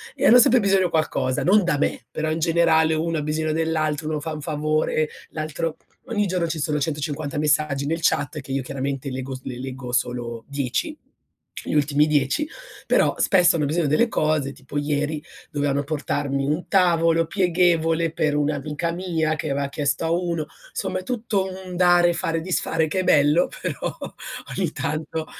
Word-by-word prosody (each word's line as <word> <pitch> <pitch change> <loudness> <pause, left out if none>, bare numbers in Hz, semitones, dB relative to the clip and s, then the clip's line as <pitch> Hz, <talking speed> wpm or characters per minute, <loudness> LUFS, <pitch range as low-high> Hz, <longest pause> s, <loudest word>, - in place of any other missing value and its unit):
e - - -1
hanno 245 +2 +8
sempre 245 +1 +6
bisogno 195 -3 +3
qualcosa, 155 -5 0
non 200 +3 +5
da 150 -4 +1
me, - - -1
però 155 0 -2
in 160 - -1
generale 160 -1 +3
uno 165 +1 -1
ha - - -2
bisogno 155 +1 -1
dell'altro, 155 -1 -1
uno 155 -1 -1
fa 160 0 -4
un 150 - -6
favore, 155 0 0 0.2
l'altro 155 +1 -3 0.3
ogni 210 -5 0
giorno 180 -2 0
ci 160 -1 -3
sono 150 0 0
150 150 0 -3
messaggi 150 -2 +1
nel 165 +3 -1
chat, 150 0 +1
che 135 - -10
io 135 0 0
chiaramente 135 +1 -3
leggo 130 0 -4
s 130 - -10
le 125 -1 -6
leggo 130 -1 -6
solo 120 -2 -2
10, 140 - -2 0.7
gli - - -3
ultimi 150 +1 +3
10, 150 - +1 0.4
però - - +3
spesso 180 -3 +4
hanno 150 -3 +1
bisogno 155 +1 0
delle 155 +12 +3
cose, 155 -5 0
tipo 140 +1 -8
ieri 150 +1 -1 0.3
dovevano 145 -1 0
portarmi 140 -2 -2
un 155 +5 -1
tavolo 165 -3 +3
pieghevole 170 -3 +2
per 150 -2 0
un'amica 150 +2 -1
mia 165 -3 -1
che 140 - -3
aveva 140 0 -1
chiesto 140 +1 -1
a 165 - 0
uno. 170 -3 -1 0.2
Insomma 185 - -2
è - - -9
tutto 215 -4 -1
un 185 -1 -7
dare, 175 -1 +5
fare, 165 -1 -1
disfare 165 -2 0
che 185 +5 -1
è - - +1
bello, 150 +2 +4
però - - -3 0.6
ogni - - 0
tanto 155 +1 -3
155 Hz, 175 wpm, -23 LUFS, 145-170 Hz, 0.7 s, hanno